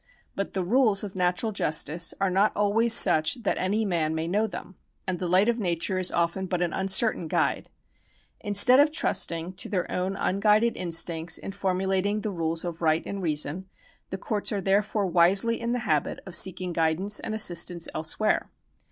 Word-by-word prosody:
But 200 Hz, -, -4 dB
the 190 Hz, -, -2 dB
rules 215 Hz, 0 st, +2 dB
of 200 Hz, -2 st, -7 dB
natural 180 Hz, +4 st, 0 dB
justice 165 Hz, -3 st, 0 dB
are 195 Hz, -1 st, 0 dB
not 195 Hz, +3 st, +1 dB
always 210 Hz, +3 st, +2 dB
such 190 Hz, +1 st, +4 dB
that -, -, -1 dB
any 210 Hz, +4 st, -1 dB
man 160 Hz, -5 st, -1 dB
may 160 Hz, +1 st, -3 dB
know 210 Hz, +5 st, 0 dB
them, 190 Hz, -, -9 dB, 0.3 s
and 185 Hz, -2 st, -3 dB
the 180 Hz, -, -3 dB
light 185 Hz, +4 st, +3 dB
of 235 Hz, 0 st, 0 dB
nature 185 Hz, 0 st, -1 dB
is 185 Hz, -, +1 dB
often 170 Hz, +3 st, -1 dB
but 180 Hz, -1 st, -1 dB
an 170 Hz, -, -3 dB
uncertain 190 Hz, -1 st, 0 dB
guide. -, -, -1 dB, 0.7 s
Instead 205 Hz, +6 st, +4 dB
of 295 Hz, +1 st, +4 dB
trusting 170 Hz, -, -1 dB
to 185 Hz, -, -4 dB
their 185 Hz, -4 st, -3 dB
own 185 Hz, +2 st, -2 dB
unguided 210 Hz, +5 st, +1 dB
instincts 165 Hz, -1 st, -1 dB
in -, -, -7 dB
formulating 195 Hz, +1 st, -1 dB
the 210 Hz, -, -4 dB
rules 165 Hz, -1 st, -2 dB
of 170 Hz, -1 st, -6 dB
right 160 Hz, 0 st, +1 dB
and 200 Hz, -1 st, -5 dB
reason, 155 Hz, +2 st, -2 dB, 0.4 s
the 190 Hz, -, -5 dB
courts 210 Hz, +2 st, -2 dB
are 205 Hz, -, -1 dB
therefore 200 Hz, +2 st, 0 dB
wisely 190 Hz, +6 st, +2 dB
in 235 Hz, -, -2 dB
the 245 Hz, -, 0 dB
habit -, -, -1 dB
of 190 Hz, -, -10 dB
seeking 180 Hz, 0 st, +2 dB
guidance 170 Hz, +5 st, +1 dB
and 215 Hz, -, -5 dB
assist 175 Hz, -6 st, +3 dB
ance 170 Hz, -2 st, -2 dB
elsewhere. 160 Hz, +7 st, -1 dB
190 Hz, 185 wpm, -26 LUFS, 170-205 Hz, 0.7 s, such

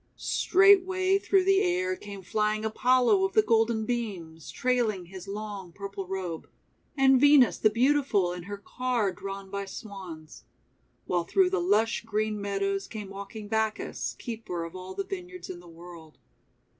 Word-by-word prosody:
Straightway 380 Hz, 0 st, +4 dB
through 390 Hz, -1 st, +3 dB
the 390 Hz, +1 st, +4 dB
air 185 Hz, +1 st, 0 dB
came 200 Hz, 0 st, -9 dB
flying 215 Hz, +2 st, 0 dB
Apollo 255 Hz, -, +3 dB
of 385 Hz, -, 0 dB
the 435 Hz, -, +5 dB
Golden 225 Hz, -, +2 dB
Beams, 190 Hz, -10 st, -4 dB
trailing 235 Hz, -7 st, 0 dB
his 190 Hz, +2 st, -10 dB
long 200 Hz, -3 st, -6 dB
purple 195 Hz, 0 st, -7 dB
robe, 180 Hz, -4 st, -5 dB, 0.5 s
and 265 Hz, -1 st, +5 dB
Venus 285 Hz, -3 st, +6 dB
the 215 Hz, -, +5 dB
Beautiful 235 Hz, -6 st, +2 dB
in 180 Hz, -, -6 dB
her 205 Hz, -, -4 dB
car 235 Hz, 0 st, -1 dB
drawn 195 Hz, +1 st, -7 dB
by 200 Hz, 0 st, -3 dB
Swans. 190 Hz, -7 st, -9 dB, 0.6 s
While 175 Hz, -1 st, 0 dB
through 370 Hz, -, +3 dB
the 385 Hz, -2 st, +1 dB
lush 225 Hz, -, +2 dB
green 215 Hz, -1 st, -2 dB
meadows 195 Hz, -1 st, -1 dB
came 210 Hz, -3 st, -7 dB
walking 200 Hz, +2 st, -8 dB
Bacchus, 220 Hz, 0 st, -2 dB
Keeper 220 Hz, -8 st, -5 dB
of 165 Hz, +2 st, -8 dB
All 185 Hz, 0 st, -8 dB
the -, -, -2 dB
Vineyards 365 Hz, -, -7 dB
in 175 Hz, -, -8 dB
the 175 Hz, -, -15 dB
World. 165 Hz, -1 st, -13 dB
210 Hz, 155 wpm, -28 LUFS, 190-255 Hz, 0.6 s, Venus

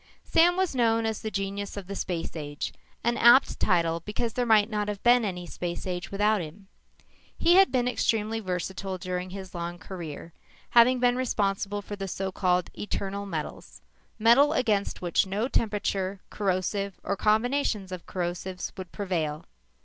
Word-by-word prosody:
Sam 350 Hz, +2 st, +4 dB
was 375 Hz, -4 st, +1 dB
known 230 Hz, -3 st, +2 dB
as 220 Hz, -1 st, -2 dB
The 220 Hz, -, -3 dB
Genius 200 Hz, 0 st, -4 dB
of 200 Hz, -, -5 dB
the 200 Hz, +2 st, -6 dB
Space 175 Hz, -4 st, -3 dB
Age, 145 Hz, -2 st, -5 dB, 0.3 s
an 235 Hz, +1 st, +1 dB
apt 240 Hz, +3 st, +6 dB
title 165 Hz, -1 st, +2 dB
because 210 Hz, +5 st, -3 dB
there 245 Hz, -1 st, -1 dB
might 215 Hz, -2 st, +5 dB
not 210 Hz, -2 st, -2 dB
have 205 Hz, -1 st, -4 dB
been 240 Hz, 0 st, +5 dB
any 180 Hz, -4 st, -3 dB
space 175 Hz, 0 st, -5 dB, 0.2 s
without 205 Hz, 0 st, +2 dB
him. 185 Hz, +5 st, -10 dB, 0.7 s
He 340 Hz, -, +4 dB
had 385 Hz, +1 st, +6 dB
been 250 Hz, -2 st, +1 dB
extremely 225 Hz, -2 st, 0 dB
versatile 190 Hz, 0 st, -3 dB
during 180 Hz, 0 st, -4 dB
his 190 Hz, 0 st, -8 dB
long 175 Hz, 0 st, -4 dB
career, 170 Hz, -3 st, -8 dB, 0.4 s
having 245 Hz, +2 st, +6 dB
been 245 Hz, 0 st, +3 dB
responsible 205 Hz, -4 st, -1 dB
for 205 Hz, -, -6 dB
the 195 Hz, -1 st, -5 dB
so 190 Hz, +1 st, -3 dB
called 180 Hz, -2 st, +1 dB
eternal 200 Hz, -1 st, -4 dB
metals 155 Hz, -, -6 dB, 0.3 s
metal 240 Hz, +7 st, +5 dB
against 215 Hz, -, 0 dB
which 175 Hz, +2 st, +2 dB
no 205 Hz, +5 st, -1 dB
temperature, 200 Hz, -5 st, -1 dB
corrosive, 195 Hz, 0 st, -1 dB
or 200 Hz, -, -1 dB
combinations 215 Hz, -1 st, +1 dB
of 185 Hz, -2 st, -7 dB
corrosives 180 Hz, +1 st, -4 dB
would 185 Hz, -2 st, -7 dB
prevail. 165 Hz, -7 st, -2 dB
200 Hz, 160 wpm, -27 LUFS, 185-225 Hz, 0.7 s, apt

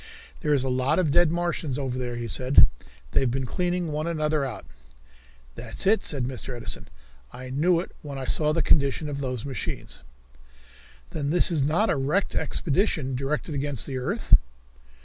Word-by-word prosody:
"There 150 Hz, -, -1 dB
is 140 Hz, -3 st, +3 dB
a -, -, -1 dB
lot 130 Hz, +4 st, +1 dB
of 170 Hz, -6 st, +2 dB
dead 175 Hz, +1 st, +5 dB
Martians 170 Hz, -5 st, -1 dB
over 135 Hz, -3 st, -2 dB
there," 120 Hz, -1 st, -3 dB
he 120 Hz, -1 st, -4 dB
said. 130 Hz, +6 st, +5 dB, 0.5 s
"They've 130 Hz, -, +2 dB
been 130 Hz, +2 st, -1 dB
cleaning 175 Hz, +3 st, -1 dB
one 155 Hz, +2 st, -2 dB
another 155 Hz, -3 st, 0 dB
out." 135 Hz, -, -5 dB, 0.9 s
"That's -, -, -5 dB
it," 215 Hz, +3 st, +4 dB
said 140 Hz, -4 st, -1 dB
Mr. 125 Hz, 0 st, -4 dB
Edison. 120 Hz, -, -3 dB, 0.4 s
"I 130 Hz, 0 st, -8 dB
knew 165 Hz, +6 st, +3 dB
it 175 Hz, -, -6 dB
when 140 Hz, -2 st, -7 dB
I 135 Hz, -, -4 dB
saw 150 Hz, +3 st, +2 dB
the 165 Hz, +1 st, +1 dB
condition 140 Hz, +1 st, +2 dB
of 140 Hz, -1 st, -4 dB
those 125 Hz, -3 st, -3 dB
machines." 125 Hz, -, -5 dB, 1.1 s
"Then 140 Hz, -2 st, -2 dB
this 175 Hz, +3 st, +4 dB
is 160 Hz, -4 st, +1 dB
not 160 Hz, +11 st, +2 dB
a 155 Hz, -, +1 dB
wrecked 150 Hz, +9 st, 0 dB
expedition, 155 Hz, -4 st, 0 dB
directed 140 Hz, +5 st, -2 dB
against 140 Hz, -2 st, -2 dB
the 135 Hz, -2 st, -3 dB
earth?" 125 Hz, -, -1 dB
140 Hz, 175 wpm, -26 LUFS, 130-160 Hz, 1.1 s, dead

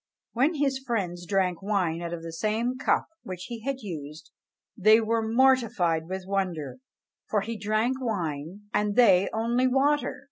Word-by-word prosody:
When 275 Hz, +8 st, +2 dB
his 275 Hz, -2 st, 0 dB
friends 185 Hz, -9 st, -3 dB
drank 190 Hz, -3 st, 0 dB
wine 185 Hz, -5 st, 0 dB
out 170 Hz, -1 st, -4 dB
of 170 Hz, -1 st, -5 dB
the 165 Hz, 0 st, -7 dB
same 220 Hz, +7 st, -1 dB
cup 255 Hz, -, +1 dB, 0.2 s
which 185 Hz, -1 st, -7 dB
he 235 Hz, -1 st, -5 dB
had 270 Hz, +3 st, -4 dB
used, 155 Hz, -5 st, -8 dB, 0.4 s
they 215 Hz, +2 st, +6 dB
were 225 Hz, 0 st, 0 dB
mortified 220 Hz, -9 st, +2 dB
with 190 Hz, 0 st, -5 dB
wonder; 185 Hz, -, -2 dB, 0.5 s
for 210 Hz, -, +1 dB
he 230 Hz, +3 st, -4 dB
drank 220 Hz, +5 st, 0 dB
wine, 175 Hz, -, -3 dB
and 210 Hz, -1 st, +1 dB
they 195 Hz, -6 st, +5 dB
only 235 Hz, +3 st, +1 dB
water! 280 Hz, +3 st, +1 dB
210 Hz, 155 wpm, -27 LUFS, 180-240 Hz, 0.5 s, they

